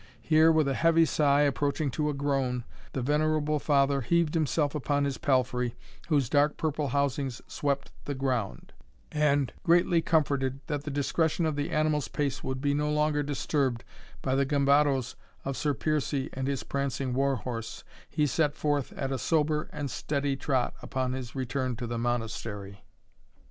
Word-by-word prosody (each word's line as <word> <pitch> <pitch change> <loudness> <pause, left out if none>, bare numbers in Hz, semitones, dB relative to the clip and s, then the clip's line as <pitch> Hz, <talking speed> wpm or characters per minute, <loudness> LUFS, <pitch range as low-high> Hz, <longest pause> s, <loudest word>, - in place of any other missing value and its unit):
Here, 160 0 +5
with 155 -3 +3
a 135 - +1
heavy 165 +3 +4
sigh, 145 -2 +3
approaching 145 0 +1
to 150 +3 -1
a - - -1
groan, 135 -3 0 0.3
the 130 - -2
venerable 150 +1 +1
father 140 -1 +2
heaved 165 +5 +1
himself 150 -2 +1
upon 145 -1 0
his 140 -2 -3
palfrey, 125 -3 +1 0.3
whose 145 -6 +2
dark 145 +3 +2
purple 150 -2 -1
housings 140 -1 -1
swept 140 -1 -2
the 145 - -3
ground; 125 - -2 0.4
and, 145 -3 +2
greatly 170 -1 +4
comforted 140 -5 +1
that 145 0 -3
the - - -3
discretion 155 +4 0
of 155 -2 0
the 145 0 -2
animal's 155 -2 +1
pace 145 -2 -2
would 130 0 -3
be 140 0 +1
no 150 +1 0
longer 150 0 +2
disturbed 140 -3 -1 0.4
by 130 - 0
the 135 +1 +3
gambadoes 140 -2 +2 0.3
of 135 - -2
Sir 145 0 0
Piercie 150 -3 -1
and 130 0 -3
his 140 -2 -2
prancing 140 -2 -2
war 135 +1 +2
horse, 115 -2 -5 0.3
he 150 -2 +1
set 150 +1 +1
forth 145 -3 0
at 135 -1 -3
a 135 - -1
sober 155 0 +1
and 145 -3 -4
steady 140 +1 -1
trot 130 -1 0
upon 130 -1 -2
his 130 -1 -6
return 130 -1 -2
to 120 +1 -5
the 120 0 -3
Monastery. 115 -4 -3
140 Hz, 165 wpm, -28 LUFS, 130-150 Hz, 0.4 s, Here